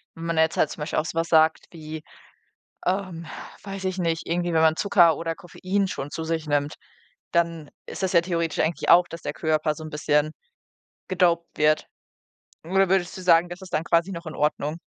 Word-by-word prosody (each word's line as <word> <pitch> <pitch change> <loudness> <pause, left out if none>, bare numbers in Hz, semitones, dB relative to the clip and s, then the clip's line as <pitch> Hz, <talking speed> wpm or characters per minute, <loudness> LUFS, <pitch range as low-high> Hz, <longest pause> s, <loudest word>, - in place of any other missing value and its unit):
wenn 165 - -7
man 165 -1 -1
jetzt 160 +1 +2
halt - - +3
zum - - -8
Beispiel 150 - -1
auch 155 - -2
so 165 - -5
was 165 0 0
sagt 160 0 +4
wie, 155 -1 -8 0.8
ähm, 185 -3 -2 0.4
weiß 195 -1 -6
ich 185 0 -2
nicht, 165 -1 -1
irgendwie 175 +1 0
wenn 160 - +3
man 160 0 +4
Zucker 175 -4 +4
oder 165 0 -2
Koffein 190 +3 -2
schon 145 -4 -5
zu 160 - -4
sich 160 -1 -2
nimmt, 145 0 0 0.6
dann 165 -3 0 0.2
ist - - -7
das 185 - +1
ja 170 - +6
theoretisch 170 -2 -2
eigentlich 160 +1 0
auch, 175 +1 +7
dass 165 - -9
der - - -4
Körper 155 -1 0
so 155 - -9
'n 155 - -7
bisschen 150 0 +1 0.8
gedoped 175 -2 +1
wird. 155 0 +2 0.8
Oder 190 +2 +2
würdest 185 -1 +1
du - - -7
sagen, 175 -1 +5
das 175 +2 -8
ist 185 - -9
dann 155 +2 0
quasi 170 +3 +2
noch 170 0 -7
in 155 - -6
Ordnung? 150 +1 -1
165 Hz, 205 wpm, -25 LUFS, 155-175 Hz, 0.8 s, auch